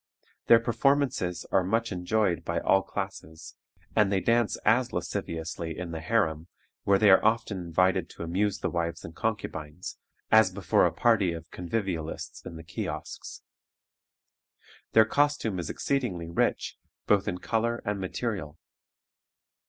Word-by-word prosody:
Their 115 - +8
performances 120 -5 +1
are 95 - +3
much 115 +5 0
enjoyed 90 0 0
by - - -1
all 95 - +3
classes, 95 -6 -7 0.4
and 105 -2 +4
they 95 - +2
dance 115 +1 +2
as 120 +3 +3
lasciviously 85 -1 -4
in 90 -2 -5
the 80 - -4
harem, 80 -3 0 0.4
where 100 0 +5
they 100 0 +6
are 95 - +6
often 110 -3 +1
invited 90 +2 +1
to - - -8
amuse 95 +4 0
the - - 0
wives 85 -1 -2
and 80 - -10
concubines, 90 -7 -4 0.3
as 110 -3 +7
before 95 -3 +2
a - - -2
party 100 -7 +2
of 80 0 -9
convivialists 90 -3 -4
in - - -8
the 80 - -9
kiosks. 80 0 -6 1.5
Their 110 -1 +7
costume 145 -6 +1
is 85 - -4
exceedingly 95 -12 -2
rich, - - 0 0.3
both 100 -2 +3
in 90 - -1
color 115 +4 -1
and 105 -1 -1
material. 95 -5 -4
95 Hz, 140 wpm, -28 LUFS, 85-110 Hz, 1.5 s, Their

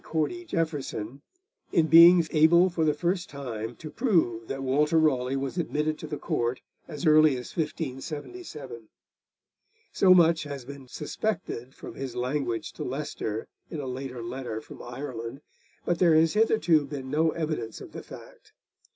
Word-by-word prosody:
Cordy 260 - -2
Jeaffreson, 145 - -3 0.5
in 165 - +3
being 170 +1 +8
able 170 +4 +5
for 170 -2 0
the 155 -1 +3
first 175 +3 -1
time 120 -5 -6
to 155 +6 -9
prove 135 - +1
that 135 0 -4
Walter 150 +5 +2
Raleigh 135 -5 +2
was 135 +5 -3
admitted 155 -2 -1
to - - -7
the 150 - -4
Court 120 -1 -1 0.3
as 150 -1 -6
early 155 -1 +6
as 125 - -9
1577. 150 - -5 1.0
So 185 -1 +6
much 165 -2 +5
has 140 -4 -6
been 140 -1 -10
suspected, 150 - -4
from - - -9
his 135 -3 -6
language 125 -2 -2
to - - -6
Leicester 125 -5 -4 0.2
in 160 - -5
a 140 - -4
later 130 -1 -5
letter 120 -2 -5
from - - -12
Ireland, 120 0 -6 0.4
but 175 - 0
there 170 -3 +5
has 160 0 +4
hitherto 175 -9 +3
been 135 -2 -6
no 160 +2 +3
evidence 155 -9 -3
of - - -11
the - - -7
fact. - - -14
150 Hz, 155 wpm, -27 LUFS, 130-165 Hz, 1.0 s, being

